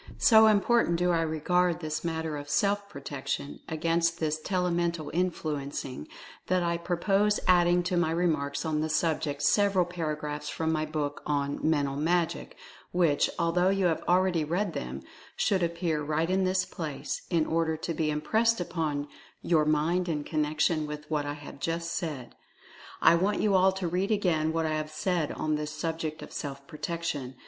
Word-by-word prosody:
So 220 -6 +7
important 215 -2 +3
do 175 +1 +2
I 165 -1 +2
regard 170 +2 +1
this 155 -2 -3
matter 160 -2 -2
of 145 0 -7
Self 200 +7 +1
Protection 140 -5 -5
against 165 +1 0
this 155 -1 -1
Telemental 170 -4 -1
Influencing 150 - -3 0.4
that 185 -1 +2
I 170 0 0
purpose 195 +4 +1
adding 175 -1 +4
to 180 0 -1
my 175 -2 +2
remarks 155 -4 0
on 155 -1 0
this 155 0 0
subject 155 -3 0
sev 200 +6 +3
eral 180 -2 +3
paragraphs 150 -4 -4
from 160 0 -1
my 155 -1 0
book 150 -2 -3
on 140 -1 -1
"Mental 145 -3 +1
Magic," 170 +2 -1 0.3
which, 170 -5 +2
although 175 +2 +2
you 195 -1 +1
have 165 -2 +1
already 180 -2 +3
read 175 +4 -1
them, 65 +2 -5 0.3
should 195 -2 +1
appear 170 -2 -1
right 155 +4 0
in 190 0 +2
this 185 0 +1
place, 155 -4 -5
in 165 -3 +2
order 160 -1 0
to 165 - -3
be 155 -1 0
impressed 220 +10 +1
upon 155 -5 -2 0.4
your 160 -3 +3
mind 165 +4 +1
in 150 -3 -1
connection 155 +1 0
with 150 0 -7
what 145 -2 0
I 145 - -2
have 145 -1 -10
just 165 +3 -2
said. 145 -8 -4 0.7
I - - +8
want 190 +5 +1
you 210 -2 +2
all 190 0 +5
to 190 -2 -3
read 180 +4 0
again 175 -7 +1
what 165 0 0
I 155 - 0
have 155 0 -2
said 155 0 -1
on 155 -1 -1
this 150 0 -3
subject 160 0 -4
of - - -11
Self 140 -1 -6
Protection. 150 -4 -4
165 Hz, 175 wpm, -28 LUFS, 150-180 Hz, 0.7 s, I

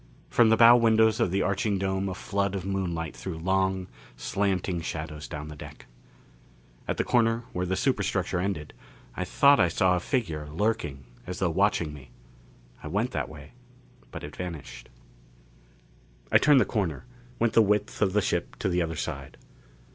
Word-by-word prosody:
From 120 -2 +5
the 110 - +4
bow 115 +1 +9
windows 110 -2 +4
of - - +2
the 95 +2 0
arching 100 +1 0
dome 95 0 -1
a 95 - -4
flood 100 0 -2
of 95 -2 -4
moonlight 85 -5 -3
threw 90 -4 -6
long, 95 +2 0 0.3
slanting 95 +1 -1
shadows 75 -1 -5
down 75 0 -6
the 75 - -8
deck. - - -11 1.0
At - - -1
the - - +1
corner 115 -1 +2
where 90 0 -2
the 95 - 0
superstructure 100 -8 0
ended, 90 -5 -3 0.4
I 90 - -2
thought 140 +9 +5
I 90 - +5
saw 90 +2 +2
a - - 0
figure 85 - -2
lurking 80 -6 -2 0.2
as 90 - -5
though 95 -3 0
watching 85 -4 +1
me. 70 -4 -12 0.7
I - - -7
went 105 +10 -1
that 75 -5 -3
way, - - -12 0.6
but - - -8
it 75 - -8
vanished. 85 -7 -7 1.4
I - - +7
turned 145 -2 +6
the - - +3
corner, 95 - -2 0.3
went 115 -1 +1
the 115 - +6
width 105 0 0
of 95 -3 +2
the 105 - +3
ship - - -2
to - - -2
the 90 0 +1
other 80 -1 -2
side. - - -5
95 Hz, 175 wpm, -27 LUFS, 85-105 Hz, 1.4 s, bow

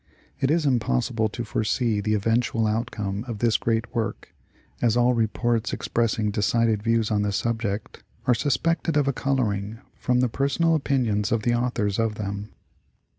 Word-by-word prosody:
It 135 - +1
is 160 0 +2
impossible 110 - +1
to 120 - -5
foresee 110 -1 0
the 110 +1 +1
eventual 115 +2 +1
outcome 105 -2 -2
of 115 -3 -4
this 115 +1 +2
great 115 0 0
work, 115 -2 -3 0.5
as 120 -1 +3
all 120 +1 +4
reports 115 0 0
expressing 110 -2 0
de 105 - -2
cided 115 -1 +2
views 115 0 +1
on 105 -1 +2
the 105 0 0
subject 110 -1 -2 0.2
are 125 - +4
suspected 155 +5 0
of 145 -2 +2
a 140 - +2
coloring 115 -6 -1 0.2
from 125 -1 0
the 125 - +3
personal 140 +7 +1
opinions 125 -9 +1
of 110 -1 +1
the 120 - +2
authors' 120 -4 0
of 115 -1 0
them. 100 0 -5
115 Hz, 165 wpm, -25 LUFS, 105-125 Hz, 0.5 s, all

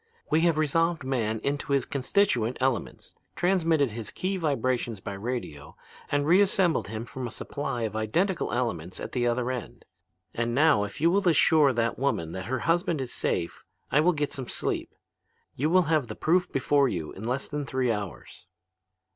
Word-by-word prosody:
We 155 - +4
have 170 -2 +3
resolved 165 +1 +1
man 115 -4 -1
into 140 0 -1
his 140 - +2
constituent 130 - +1
elements, 130 -3 -2 0.2
transmitted 165 - +2
his 110 -1 -6
key 190 +1 -2
vibrations 130 - -1
by 100 - -6
radio, 100 - -5 0.4
and 145 0 +1
reassembled 185 - +3
him 110 +2 -5
from 130 0 -5
a - - -5
supply 125 +1 -4
of 110 -1 -3
identical 170 - 0
elements 110 -8 -2
at - - -6
the 120 -2 0
other 120 +1 0
end. 125 -3 -7 0.5
And 120 0 -1
now, 145 -8 +4
if 105 +7 -9
you 165 +2 +4
will 195 -1 +3
assure 155 -2 +5
that 115 0 -1
woman 85 -12 0
that 95 +2 -5
her 130 +3 -2
husband 170 0 +1
is 130 -2 -4
safe, 85 -1 -2 0.3
I 150 - +4
will 175 +4 +4
get 145 -2 -2
some 130 -3 -5
sleep. - - -2 0.7
You 150 +4 0
will 185 +2 +5
have 155 -5 +1
the 110 - -6
proof 180 +2 +1
before 140 0 +2
you 80 -7 -4
in 95 - -10
less 125 +4 -2
than 150 -1 -3
three 130 -3 0
hours.' 105 -4 -6
135 Hz, 180 wpm, -27 LUFS, 115-160 Hz, 0.7 s, assure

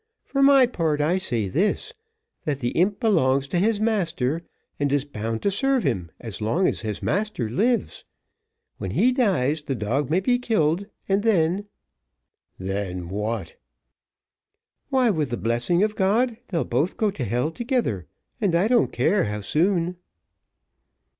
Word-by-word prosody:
For 275 - -1
my 275 -1 +7
part, 165 -10 -1
I 165 +6 +2
say 120 - -1
this, 205 - 0 0.5
that 145 -3 -1
the 120 -3 -1
imp 195 +8 +1
belongs 140 - +2
to 175 - +1
his 210 +2 +2
master, 170 - 0 0.4
and 145 -1 +1
is 145 -1 +1
bound 115 -4 -4
to 200 - +2
serve 270 +6 +1
him 95 - -1
as 110 -5 -8
long 140 - +2
as - - -1
his 110 -3 -4
master 205 - -1
lives. 230 - 0 0.8
When - - -4
he 255 - +3
dies 170 - +1
the 140 -2 -3
dog 125 +5 -1
may 170 +4 +3
be 245 +6 +1
killed, 195 -5 +1 0.2
and 195 +1 +2
then 195 -2 +1 0.5
" - - -55
"Then 95 -2 -4
what?" 105 -1 -3 1.3
"Why, 255 -4 +3
with 155 -7 -1
the 120 - -2
blessing 120 - +1
of 215 0 0
God, 225 +5 +2
they'll 170 -4 -1
both 140 +9 0
go 215 -2 +1
to 150 -9 -5
hell 125 +8 -1
together, 230 - -1 0.3
and 190 -5 +2
I 180 +5 +3
don't 240 -1 +3
care 200 -2 +2
how 105 0 -3
soon." 175 - +1
165 Hz, 160 wpm, -24 LUFS, -, 1.3 s, my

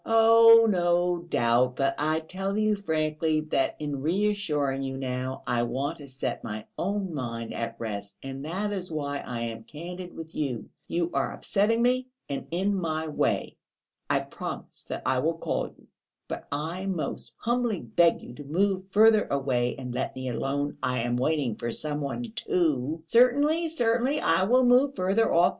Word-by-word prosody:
"Oh, 230 0 +7
no 175 -2 +2
doubt. 120 0 +2
But 135 0 +1
I 155 +2 +1
tell 195 +5 -3
you 215 0 +2
frankly 155 -4 0
that 155 -3 0
in 145 -3 -4
reassuring 160 -6 0
you 135 0 -3
now, 130 0 -3
I 120 -2 +1
want 135 +7 -2
to 145 - -10
set 130 0 -4
my 110 -1 -5
own 195 -1 -2
mind 115 -5 -4
at 115 0 -3
rest, 100 -3 -5
and 135 0 -6
that 195 +7 -2
is 185 -2 -4
why 145 -2 -2
I 120 -3 -5
am 115 -1 -4
candid 175 +6 -8
with 160 0 -8
you; 125 -8 -3 0.2
you 170 0 -1
are - - 0
upsetting 225 +3 +1
me 255 +1 +2 0.2
and 140 - -4
in 190 +4 0
my 160 -4 -2
way. 150 - 0 0.5
I - - +2
promise - - -7
that - - -5
I 130 -1 +2
will 165 +5 0
call - - -1
you. - - -19 0.4
But - - -6
I 165 +6 -3
most 180 -5 -3
humbly 240 -4 0
beg 165 +9 +3
you - - -9
to 145 - -9
move 185 +6 0
further 215 +2 +5
away 130 -3 0
and 125 -2 -6
let - - -2
me 130 0 -4
alone. 140 +4 -2
I 125 - 0
am 120 +1 0
waiting 130 -3 0
for 120 - -3
some 150 +4 -3
one 140 - -3
too." 160 - -1
"Certainly, 285 - +4
certainly, 245 -1 +1
I 185 - +3
will 250 +4 +4
move 255 +3 +4
further 195 +4 +2
off. 175 +2 +5
160 Hz, 175 wpm, -27 LUFS, 135-200 Hz, 0.5 s, Oh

